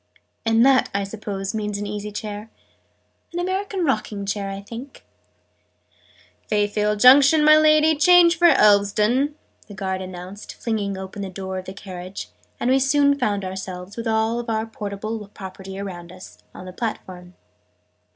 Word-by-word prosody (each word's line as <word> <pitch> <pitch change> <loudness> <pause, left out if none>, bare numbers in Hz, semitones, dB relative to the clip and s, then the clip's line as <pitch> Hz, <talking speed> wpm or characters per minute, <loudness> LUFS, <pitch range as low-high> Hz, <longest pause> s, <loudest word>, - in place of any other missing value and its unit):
"And 225 +2 +4
that, 270 -1 +4
I 200 - +1
suppose, 200 -1 -5
means 210 -2 -3
an 205 - -4
easy 210 0 -5
chair?" 210 +1 -6 0.8
"An 345 - -3
American 375 0 -2
rocking 215 -6 -2
chair, 195 0 -3
I 195 0 -5
think 235 +7 -10 0.7
" - - -34
"Fayfield 210 0 0
Junction, 275 +5 +7
my 305 0 +8
Lady, 310 0 +5
change 345 +2 +6
for 345 0 +5
Elveston!" 215 +4 +3 0.3
the 205 - -11
guard 190 -1 -3
announced, 185 +2 -9
flinging 205 -4 -3
open 190 +2 -7
the 195 - -4
door 190 0 -5
of 185 - -10
the 190 - -7
carriage: 185 - -8 0.3
and 245 - +1
we 265 - +4
soon 280 +1 +3
found 205 -6 -1
ourselves, 185 0 -7
with 230 0 -5
all 225 +2 0
our 220 0 -1
portable 215 0 -6
property 190 0 -9
around 180 -3 -7
us, 185 0 -13
on 185 - -11
the 185 - -9
platform. 185 -5 -6
210 Hz, 155 wpm, -22 LUFS, 195-255 Hz, 0.8 s, my